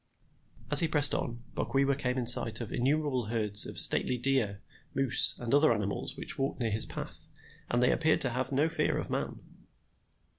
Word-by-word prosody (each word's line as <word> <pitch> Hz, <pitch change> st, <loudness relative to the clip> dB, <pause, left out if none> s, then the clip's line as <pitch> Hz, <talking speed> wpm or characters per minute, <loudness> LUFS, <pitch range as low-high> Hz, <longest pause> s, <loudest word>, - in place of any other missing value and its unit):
As -, -, +12 dB
he 165 Hz, -, +9 dB
pressed 145 Hz, -3 st, +4 dB
on, 120 Hz, 0 st, -5 dB
Bok -, -, -6 dB
wewa 140 Hz, 0 st, 0 dB
came 125 Hz, -1 st, -4 dB
in 125 Hz, -, -3 dB
sight 115 Hz, -1 st, +3 dB
of 115 Hz, -, -8 dB
innumerable 135 Hz, -1 st, -2 dB
herds 105 Hz, -2 st, -1 dB
of -, -, -10 dB
stately 125 Hz, -, +1 dB
deer, 120 Hz, -6 st, -1 dB, 0.4 s
moose, 135 Hz, -3 st, +3 dB
and 120 Hz, 0 st, -6 dB
other 145 Hz, 0 st, +3 dB
animals 105 Hz, -3 st, -5 dB
which -, -, -5 dB
walked 135 Hz, +1 st, -4 dB
near 115 Hz, -3 st, -3 dB
his 110 Hz, +2 st, 0 dB
path, -, -, -10 dB, 0.4 s
and 120 Hz, +1 st, -1 dB
they 125 Hz, -, +2 dB
appeared 160 Hz, 0 st, 0 dB
to 130 Hz, -, +2 dB
have 130 Hz, +2 st, -4 dB
no 140 Hz, +4 st, 0 dB
fear 165 Hz, -, -2 dB
of -, -, -6 dB
man. -, -, -5 dB
125 Hz, 190 wpm, -28 LUFS, 115-140 Hz, 0.4 s, As